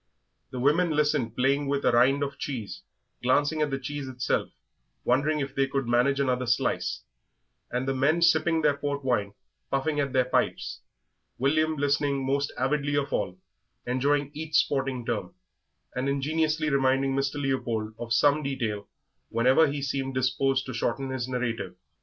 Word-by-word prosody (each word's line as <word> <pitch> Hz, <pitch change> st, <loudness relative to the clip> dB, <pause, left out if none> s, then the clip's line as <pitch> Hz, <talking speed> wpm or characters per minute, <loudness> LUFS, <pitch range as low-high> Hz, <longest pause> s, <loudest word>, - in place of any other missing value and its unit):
The 130 Hz, -, -7 dB
women 150 Hz, +7 st, +3 dB
listened, 150 Hz, -7 st, +1 dB
playing 140 Hz, +3 st, +1 dB
with 140 Hz, 0 st, -1 dB
a -, -, +5 dB
rind 130 Hz, +4 st, +4 dB
of 140 Hz, 0 st, -5 dB
cheese, 110 Hz, -9 st, -5 dB, 0.4 s
glancing 145 Hz, +5 st, +2 dB
at 150 Hz, -, +2 dB
the 135 Hz, -, -1 dB
cheese 140 Hz, +1 st, -5 dB
itself, 125 Hz, -1 st, -1 dB, 0.5 s
wondering 140 Hz, +5 st, +2 dB
if 135 Hz, -1 st, -4 dB
they 135 Hz, 0 st, +1 dB
could 135 Hz, -2 st, -2 dB
manage 125 Hz, +4 st, +2 dB
another 125 Hz, -2 st, 0 dB
slice, 125 Hz, -, 0 dB, 0.7 s
and 125 Hz, +2 st, -2 dB
the 135 Hz, -, +1 dB
men 150 Hz, +6 st, +2 dB
sipping 170 Hz, -1 st, +3 dB
their 145 Hz, -1 st, +4 dB
port 140 Hz, 0 st, -3 dB
wine, 105 Hz, -5 st, 0 dB, 0.3 s
puffing 145 Hz, +2 st, 0 dB
at 140 Hz, -2 st, 0 dB
their 130 Hz, -1 st, +3 dB
pipes, 130 Hz, -, -1 dB, 0.6 s
William 155 Hz, +4 st, +2 dB
listening 140 Hz, -1 st, 0 dB
most 140 Hz, +1 st, 0 dB
avidly 145 Hz, +2 st, 0 dB
of 140 Hz, -1 st, -1 dB
all, 95 Hz, -3 st, -1 dB, 0.5 s
enjoying 140 Hz, +3 st, +1 dB
each 155 Hz, 0 st, -5 dB
sporting 135 Hz, -5 st, +1 dB
term, -, -, -3 dB, 0.6 s
and 130 Hz, +2 st, -1 dB
ingeniously 155 Hz, +2 st, 0 dB
reminding 135 Hz, 0 st, +2 dB
Mr. 135 Hz, +1 st, 0 dB
Leopold 120 Hz, -6 st, -1 dB
of 120 Hz, -1 st, -6 dB
some 145 Hz, +5 st, +4 dB
detail 115 Hz, -8 st, -3 dB, 0.4 s
whenever 130 Hz, +7 st, +4 dB
he 140 Hz, 0 st, -3 dB
seemed 135 Hz, -1 st, -2 dB
disposed 130 Hz, +1 st, +1 dB
to 130 Hz, -, -6 dB
shorten 130 Hz, +3 st, -2 dB
his 130 Hz, -2 st, -3 dB
narrative. 120 Hz, -7 st, -3 dB
135 Hz, 160 wpm, -27 LUFS, 125-145 Hz, 0.7 s, a